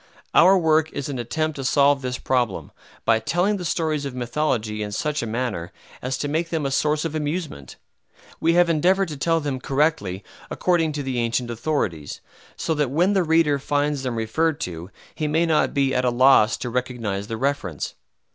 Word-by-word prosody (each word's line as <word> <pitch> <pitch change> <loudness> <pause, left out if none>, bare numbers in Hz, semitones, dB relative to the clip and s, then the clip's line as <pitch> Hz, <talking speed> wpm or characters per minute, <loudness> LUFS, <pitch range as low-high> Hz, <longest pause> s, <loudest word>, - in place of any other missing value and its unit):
Our 190 +2 +7
work 160 -2 +2
is 140 - -4
an 135 -3 -4
attempt 155 +6 -2
to 135 - -4
solve 140 +1 +3
this 125 -1 -3
problem, 125 -6 -1 0.3
by 115 -1 +4
telling 180 - 0
the 180 - -6
stories 160 -3 -1
of 140 -3 -5
mythology 120 -4 -1
in 105 -1 -4
such 150 +7 -1
a 115 - -3
manner 110 -7 -3 0.3
as 130 +1 -2
to 145 - -2
make 160 +3 -1
them 160 -4 -2
a 135 - -1
source 150 +3 +1
of 160 - -3
amusement. 150 - -4 0.6
We 165 +1 +2
have 175 0 +5
endeavored 180 +4 +2
to 150 - -6
tell 165 +3 +1
them 145 -4 -3
correctly, 135 - 0 0.3
according 165 -4 +1
to 145 -1 -3
the 130 -2 -2
ancient 120 +1 -1
authorities, 110 - -2 0.4
so 160 - -1
that 150 -4 0
when 175 +8 +2
the 195 - +3
reader 160 -3 +3
finds 145 0 0
them 125 -3 -3
referred 145 +8 0
to 85 0 -5 0.2
he 155 -2 -2
may 160 +3 +2
not 160 -2 +2
be 135 -1 +1
at 125 - +1
a 125 - +3
loss 120 -3 +5
to 120 - -5
recognize 115 -5 -3
the 115 - -4
reference. 115 - -2
140 Hz, 195 wpm, -23 LUFS, 120-160 Hz, 0.6 s, Our